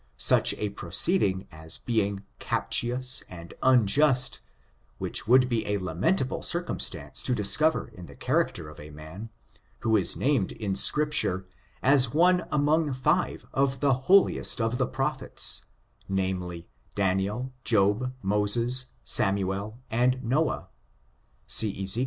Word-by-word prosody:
Such - - +5
a 105 - -3
proceeding 95 - 0
as 80 +2 -5
being 100 -4 -2 0.2
captious 125 +2 0
and 85 -1 -11
unjust, 130 +2 +3 0.6
which - - -4
would 125 +2 +5
be 120 -3 -2
a 105 0 0
lamentable 100 - -1
circumstance 175 0 -2
to 125 - 0
discov 120 +10 +3
er - - -5
in 90 -1 -12
the - - -14
character 80 -3 -1
of 75 - -13
a 75 - -11
man, 80 +9 -10 0.5
who 110 -1 +1
is 100 -4 0
named 130 -8 0
in 100 -3 -4
Scrip 150 +10 +2
ture 95 -8 0 0.4
as 135 -1 +3
one 180 +1 +3
among 150 0 +1
five 150 +8 -1
of 135 -1 0
the 140 0 +2 0.2
holiest 195 -8 +3
of 115 +2 -1
the - - +1
prophets, - - 0 0.4
namely, 90 -3 -3 0.3
Daniel, 100 +6 -1
Job, 105 +3 +1
Moses, 115 +6 +2 0.2
Samuel 100 +2 0
and 125 +3 +1
Noah, 145 +6 -1 0.8
see 100 -3 +3
Ezek. 95 +4 0
115 Hz, 130 wpm, -26 LUFS, 95-130 Hz, 0.8 s, Such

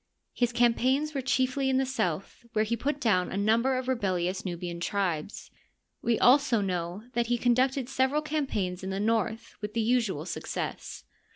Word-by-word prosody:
His 240 -1 +1
campaigns 255 +5 +2
were 275 - -1
chiefly 260 +1 +1
in 260 - +2
the 265 - +2
south, 195 - -3
where 215 0 +2
he 230 +2 0
put 280 +5 -2
down 185 -9 +2
a - - -3
number 230 +6 +2
of 255 0 -4
rebellious 190 -7 -1
Nubian 175 -1 -4
tribes. 180 -2 -2 0.5
We 230 -1 +1
zdso 250 -5 +4
know 180 +2 -3
that 235 -2 0
he 240 0 +1
conducted 255 +2 +2
several 270 +3 +1
campaigns 215 - -2
in 190 - -3
the 190 0 -2
north 225 +1 -1
with 210 +1 -5
the 230 - +2
usual 220 -9 +1
success. - - -5
230 Hz, 170 wpm, -28 LUFS, 195-260 Hz, 0.5 s, zdso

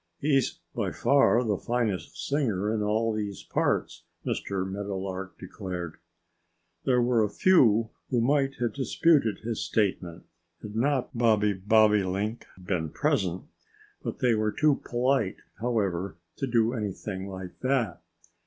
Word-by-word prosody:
"He's 135 - +1 0.2
by - - -1
far 135 -3 +4
the 105 -5 0
finest 105 -8 -2
singer 110 -8 0
in 110 - -1
all 110 +2 +1
these 105 -2 -4
parts," - - -1 0.2
Mr. 95 -1 -2
Meadowlark 95 -1 -5
declared. 90 -3 -6 0.9
There 125 -2 +3
were 120 -2 +3
a 105 - 0
few 115 - +4 0.2
who 125 - +2
might 135 +2 +2
have 120 -1 -1
disputed 140 -3 +2
his 115 -1 -2
statement, 90 -5 -1 0.4
had 105 -1 -7
not 130 +2 0
Bobby 110 -3 +3
Bobolink 105 +1 +2
been 90 -4 -2
present. 90 +3 0 0.8
They 125 -2 +3
were 110 -1 +1
too 150 +2 +2
polite, 120 -4 +1 0.2
however, 100 -7 -1 0.2
to 135 - -2
do 115 -1 +2
anything 100 -3 -4
like 95 -1 -8
that. 130 -8 0
110 Hz, 125 wpm, -27 LUFS, 95-120 Hz, 0.9 s, far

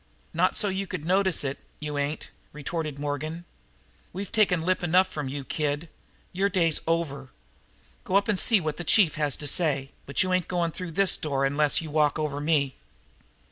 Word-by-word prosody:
"Not - - +2
so 210 - +2
you 195 0 -2
could 150 - -5
notice 190 -1 +2
it, 140 0 -3 0.2
you 150 -1 -5
ain't," 145 +2 -3 0.2
retorted 150 0 -4
Morgan. 150 +4 -4 0.7
"We've 195 +2 -6
taken 195 -7 +2
lip 185 +2 +1
enough 180 +2 +3
from 150 -7 -5
you, 140 +1 -5
kid. 150 +3 -2 0.4
Your 195 +3 +1
day's 170 -5 +2
over. 145 -5 -1 0.7
Go 185 - -2
up 200 +2 +3
and 210 -4 +2
see 225 -4 +6
what 155 -3 -3
the 175 - -4
chief 175 -1 +4
has 150 -2 +1
to 150 - -5
say, 140 -3 +2 0.2
but 140 - +2
you 185 0 -1
ain't 185 -2 +1
going 175 -2 -1
through 180 0 -7
this 195 +2 +3
door 140 -3 -1
unless 145 +2 +3
you 155 - -7
walk 150 -1 +2
over 150 -2 -2
me." 145 -3 +1
160 Hz, 185 wpm, -26 LUFS, 145-185 Hz, 0.7 s, see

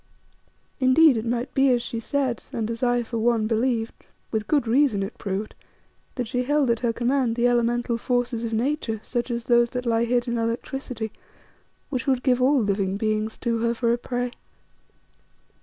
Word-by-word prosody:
Indeed, 270 +2 +6
it 225 0 -2
might 240 +2 -2
be 270 0 +4
as 245 -2 +2
she 230 - -4
said, 260 0 -1
and 225 0 -2
as 230 - -5
I 245 -1 +2
for 230 0 -4
one 230 -1 +2
believed, 225 0 0 0.4
with 215 -2 -2
good 290 -5 +2
reason, 240 -4 +3
it 195 - -6
proved, 200 +2 -3 0.6
that 250 -3 -2
she 250 +2 -1
held 280 -1 +2
at 230 - 0
her 240 -2 +1
command 245 0 0
the 240 +1 +3
elemental 240 0 +1
forces 245 -1 -1
of 230 - -3
Nature, 230 -1 -1
such 240 0 -3
as 235 -1 -2
those 240 0 +3
that 250 0 -4
lie 230 0 +2
hid 240 +1 0
in 235 -1 -1
electricity, 230 0 -3 0.8
which 255 -2 -2
would 260 -2 +1
give 255 -2 +2
all 270 +2 +4
living 200 -1 0
beings 215 +1 -1
to 235 -2 0
her 235 +1 0
for 235 0 +1
a - - +1
prey. 245 0 -3
240 Hz, 185 wpm, -24 LUFS, 225-250 Hz, 0.8 s, Indeed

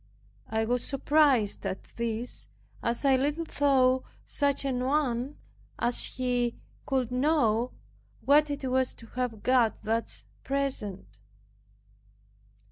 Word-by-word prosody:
I 220 0 0
was 245 +1 0
surprised 275 -6 +2
at 195 -1 -3
this, 235 +1 -2 0.3
as 235 +4 -1
I 270 -1 +6
little 295 +5 0
thought 260 -4 +3 0.2
such 280 -1 0
an 250 -2 0
one 265 -1 0 0.4
as 240 0 +1
he 245 -2 0 0.3
could 260 -4 0
know 250 -4 +2 0.6
what 295 +2 +5
it 285 -1 -4
was 260 0 +1
to 230 - -13
have 245 -4 -2
God 250 -3 +3
thus 225 +1 -2 0.2
present. 210 - -3
255 Hz, 115 wpm, -28 LUFS, 235-275 Hz, 0.6 s, I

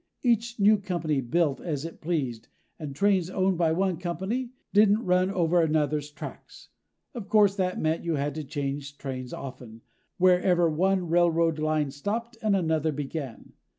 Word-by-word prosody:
Each 235 -1 +1
new 210 +1 +5
company 170 -7 -1
built 145 +3 0
as 150 -3 -3
it 165 - -9
pleased, 135 -9 -2 0.3
and 145 -3 -6
trains 190 0 +2
owned 190 -1 0
by 165 -2 +3
one 185 +1 0
company 190 +9 -3 0.2
didn't 210 +2 +4
run 180 +1 +3
over 175 -2 +2
another's 150 -2 0
tracks. 150 -1 -10 0.4
Of 230 -6 -7
course, 205 -2 +4
that 185 -1 -1
meant 160 +1 0
you 170 -2 -1
had 145 0 -1
to 155 +1 -5
change 140 0 -4
trains 130 -3 -6
often 125 -4 -9 0.4
wherever 180 -1 +4
one 185 +3 +1
railroad 165 -1 +2
line 155 -2 0
stopped 225 - -4
and 215 -2 +2
another 160 -4 +1
began. 140 -3 -6
165 Hz, 155 wpm, -27 LUFS, 145-190 Hz, 0.4 s, new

